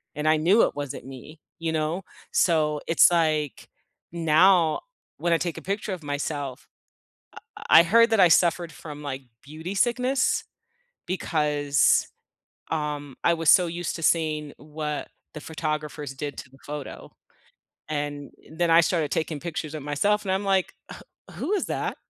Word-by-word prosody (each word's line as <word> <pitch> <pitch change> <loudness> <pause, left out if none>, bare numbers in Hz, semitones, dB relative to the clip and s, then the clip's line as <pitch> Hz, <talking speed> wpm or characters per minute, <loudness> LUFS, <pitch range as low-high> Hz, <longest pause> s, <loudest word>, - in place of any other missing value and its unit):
and 150 +1 -2
I 155 - +4
knew 185 +9 +4
it - - +1
wasn't 145 -4 -6
me, 135 +4 -11 0.2
you 165 -1 -2
know. 160 +3 -1 0.3
So 155 -3 +2
it's, 165 - +6
like, 155 -4 0 0.4
now 170 0 +4 0.4
when 170 - -1
I 165 - +4
take 170 -1 -3
a - - -7
picture 200 +1 -3
of 180 - -7
myself, 145 -2 -4 0.9
I - - +6
I - - +7
heard 230 +6 +5
that 225 - +3
I 180 - +8
suffered 170 0 +3
from, 150 -2 -9
like, 135 -1 -5 0.2
beauty 160 +6 -7
sickness 250 +5 +1 0.6
because, 150 -5 +1 0.6
um, 150 -3 -3
I 170 - +5
was 165 -2 -3
so 180 - +6
used 170 0 -4
to 165 - -8
seeing 155 -3 +1
what 150 0 -5 0.3
the 155 - -7
photographers 155 -3 -4
did 145 +1 -5
to 130 - -9
the 135 - -19
photo, 145 -1 -7 0.8
and 145 -2 -4 0.2
then 170 +1 0
I 165 - +7
started 160 -4 0
taking 155 -2 -2
pictures 160 -2 -5
of 155 - -5
myself 200 +9 0
and 190 - 0
I'm, 190 +2 -1
like, 195 -2 +1 0.2
wh - - -11 0.3
who - - -4
is 395 - 0
that? - - -3
155 Hz, 160 wpm, -25 LUFS, 150-175 Hz, 0.9 s, I